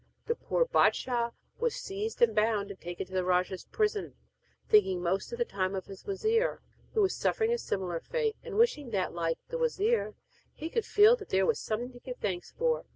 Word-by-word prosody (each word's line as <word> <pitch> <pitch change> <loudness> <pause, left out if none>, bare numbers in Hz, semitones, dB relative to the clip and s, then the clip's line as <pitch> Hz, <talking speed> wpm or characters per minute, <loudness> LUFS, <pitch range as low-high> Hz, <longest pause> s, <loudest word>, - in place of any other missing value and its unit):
Then 470 - 0
the - - -29
poor - - +3
bâdshah 240 - +2 0.3
was 480 0 0
seized 430 - -2
and 225 -2 +5
bound 210 -2 +1
and 195 - -11
taken 175 +1 -5
to 185 - -15
the 185 -1 +1
rajah's 180 +1 0
prison, 425 -1 -1 0.5
thinking 190 -4 +4
most 185 +3 -1
of 475 - -4
the 475 - +1
time 190 - -2
of 190 - -4
his 195 -1 -12
wazir, 445 +4 +1 0.4
who 430 - +4
was 380 - +2
suffering 455 0 +1
a 475 - 0
similar 180 - -2
fate, 455 - -1
and 455 -4 -5
wishing 440 - +3
that, 195 -5 -1
like 165 -1 -1
the - - -3
wazir, 470 -1 +1 0.4
he 320 +2 -6
could 460 - 0
feel 425 +3 +6
that - - -11
there 190 0 +3
was - - +1
something 235 +3 -3
to 245 - -13
give 250 0 -7
thanks 180 -4 -3
for. 485 0 0
255 Hz, 210 wpm, -30 LUFS, -, 0.5 s, feel